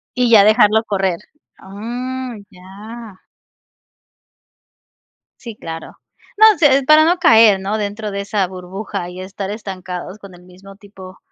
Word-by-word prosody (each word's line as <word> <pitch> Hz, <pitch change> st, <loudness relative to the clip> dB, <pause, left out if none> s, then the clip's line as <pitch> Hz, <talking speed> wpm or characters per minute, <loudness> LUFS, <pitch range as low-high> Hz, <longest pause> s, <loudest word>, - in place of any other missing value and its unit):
Y 250 Hz, -2 st, +1 dB
ya 215 Hz, -3 st, +7 dB
dejarlo 215 Hz, 0 st, +4 dB
correr. 190 Hz, -5 st, -2 dB, 0.4 s
Oh, 190 Hz, -, -15 dB
mm, 245 Hz, +1 st, -6 dB
ya. 205 Hz, +3 st, -12 dB, 2.2 s
Sí, 230 Hz, -3 st, -9 dB
claro. 165 Hz, -4 st, -9 dB, 0.4 s
No 435 Hz, -1 st, +6 dB
sé, 290 Hz, -5 st, +4 dB
es -, -, -7 dB
para 305 Hz, +3 st, +5 dB
no 350 Hz, +2 st, +2 dB
caer, 220 Hz, -, +5 dB
¿no? 200 Hz, +3 st, -3 dB
Dentro 210 Hz, 0 st, -5 dB
de 200 Hz, -, -5 dB
esa 200 Hz, -1 st, -1 dB
burbuja 185 Hz, 0 st, -7 dB
y 180 Hz, +1 st, -9 dB
estar 195 Hz, +1 st, -7 dB
estancados 185 Hz, -3 st, -7 dB
con 195 Hz, -3 st, -13 dB
el 175 Hz, -, -18 dB
mismo 185 Hz, +2 st, -16 dB
tipo 195 Hz, -2 st, -14 dB
205 Hz, 145 wpm, -17 LUFS, 190-230 Hz, 2.2 s, ya